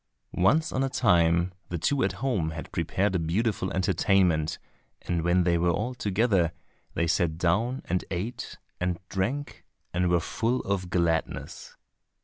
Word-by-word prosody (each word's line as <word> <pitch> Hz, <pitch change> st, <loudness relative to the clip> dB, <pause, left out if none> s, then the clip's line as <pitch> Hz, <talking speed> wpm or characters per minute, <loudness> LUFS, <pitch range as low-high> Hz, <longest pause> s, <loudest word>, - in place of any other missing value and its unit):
Once 135 Hz, -, +3 dB
on 130 Hz, -, 0 dB
a 135 Hz, -, 0 dB
time 85 Hz, -4 st, +3 dB, 0.2 s
the 85 Hz, -, -2 dB
two 135 Hz, -, +1 dB
at 95 Hz, -, +1 dB
home 100 Hz, -12 st, +1 dB
had 80 Hz, 0 st, -7 dB
prepared 95 Hz, +4 st, 0 dB
a 90 Hz, -, +1 dB
beautiful 95 Hz, +4 st, 0 dB
entertainment, 90 Hz, -4 st, +2 dB, 0.5 s
and 85 Hz, -1 st, -1 dB
when 85 Hz, +2 st, +3 dB
they 85 Hz, -1 st, +2 dB
were 85 Hz, +1 st, +2 dB
all 105 Hz, +9 st, -1 dB
together, 100 Hz, -6 st, +1 dB, 0.4 s
they 85 Hz, -, +1 dB
sat 80 Hz, -1 st, +1 dB
down 110 Hz, +10 st, 0 dB
and 90 Hz, 0 st, -1 dB
ate 105 Hz, +7 st, -4 dB, 0.2 s
and 90 Hz, -1 st, 0 dB
drank 125 Hz, +10 st, -3 dB, 0.3 s
and 90 Hz, 0 st, +1 dB
were 85 Hz, 0 st, +3 dB
full 115 Hz, +8 st, -1 dB
of 95 Hz, -2 st, -2 dB
gladness. 85 Hz, -2 st, -2 dB
90 Hz, 150 wpm, -27 LUFS, 85-105 Hz, 0.5 s, Once